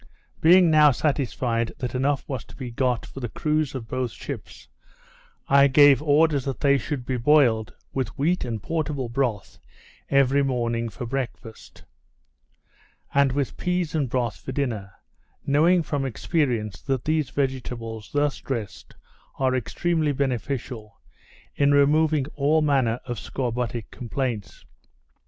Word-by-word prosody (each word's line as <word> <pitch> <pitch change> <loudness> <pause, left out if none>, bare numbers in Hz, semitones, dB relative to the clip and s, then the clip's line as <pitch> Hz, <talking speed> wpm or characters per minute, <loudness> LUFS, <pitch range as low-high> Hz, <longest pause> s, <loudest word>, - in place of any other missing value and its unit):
Being 175 +1 +6
now 150 -1 +7
satisfied, 125 -4 -1
that 125 -2 -4
enough 135 +3 0
was 130 -7 -4
to - - -15
be 125 -3 -6
got 125 0 0
for - - -10
the 120 -3 -4
crews 155 +3 -1
of 120 -4 -6
both 130 0 -2
ships, - - -9 0.8
I 140 0 +6
gave 140 -1 +6
orders 150 -2 +3
that 135 -2 -3
they 140 -1 +4
should 130 0 -4
be 130 0 -1
boiled, 120 -4 +3 0.2
with 130 -3 -3
wheat 165 +6 +1
and 115 -4 -4
portable 150 -6 -2
broth, 120 -5 -2 0.5
every 140 0 +3
morning 120 -3 -1
for 120 +4 -7
breakfast; 120 -2 -6 1.3
and 140 -1 +4
with 140 0 -2
peas 180 -3 -1
and 145 -5 0
broth 120 -7 -1
for 105 - -7
dinner; 115 -8 -3 0.5
knowing 165 +5 +4
from 145 -2 -2
experience, 120 - -1
that 135 -3 -2
these 155 -3 0
vegetables, 120 -5 -3
thus 145 -1 0
dressed, 115 -7 -6 0.4
are 130 -1 +1
extremely 150 +6 0
beneficial, 125 -4 -3 0.5
in 145 0 +3
removing 150 0 +3
all 150 +2 +2
manner 130 -5 +2
of 120 -3 -4
scorbutic 120 -3 -3
complaints. 120 -3 -4
135 Hz, 135 wpm, -24 LUFS, 120-145 Hz, 1.3 s, now